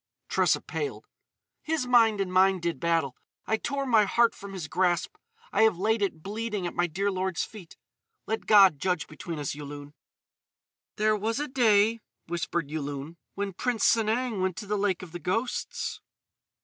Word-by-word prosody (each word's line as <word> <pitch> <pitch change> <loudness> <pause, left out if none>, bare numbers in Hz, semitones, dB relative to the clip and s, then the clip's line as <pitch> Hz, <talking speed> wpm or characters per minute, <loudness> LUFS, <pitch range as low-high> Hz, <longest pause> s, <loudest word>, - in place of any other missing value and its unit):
Tressa - - +2
paled: 435 - -5 0.6
"His 310 -4 -1
mind 230 -4 +4
and 185 -2 -2
mine 190 0 +4
did 170 -1 -2
battle. 165 -6 0 0.3
I 220 - +1
tore 275 +4 -2
my 225 -5 +4
heart 235 +3 +3
from 200 0 -10
his 180 -6 -5
grasp. 175 +2 0 0.4
I - - +3
have 220 -5 +4
laid 220 +4 +1
it, 170 -6 -2
bleeding, 210 -1 -3
at 175 - -3
my 175 - +1
dear 195 +5 -1
lord's 185 -2 -1
feet. 190 -6 -11 0.5
Let 220 - -3
God 195 -8 +7
judge 180 -1 0
between 165 +1 -7
us, 145 -2 -3
Yulun." 145 0 -9 1.0
"There 215 0 +2
was 220 +4 -1
a 295 - -2
day," 225 -3 +3 0.3
whispered 170 -3 -3
Yulun, 145 +1 -5 0.2
"when 200 -1 -3
Prince 240 +4 -1
Sanang 225 -1 +2
went 185 -2 -1
to 205 - -5
the 210 +1 -1
Lake 195 -3 0
of 175 - -10
the 175 - -6
Ghosts." 240 - -2
195 Hz, 170 wpm, -27 LUFS, 170-220 Hz, 1.0 s, God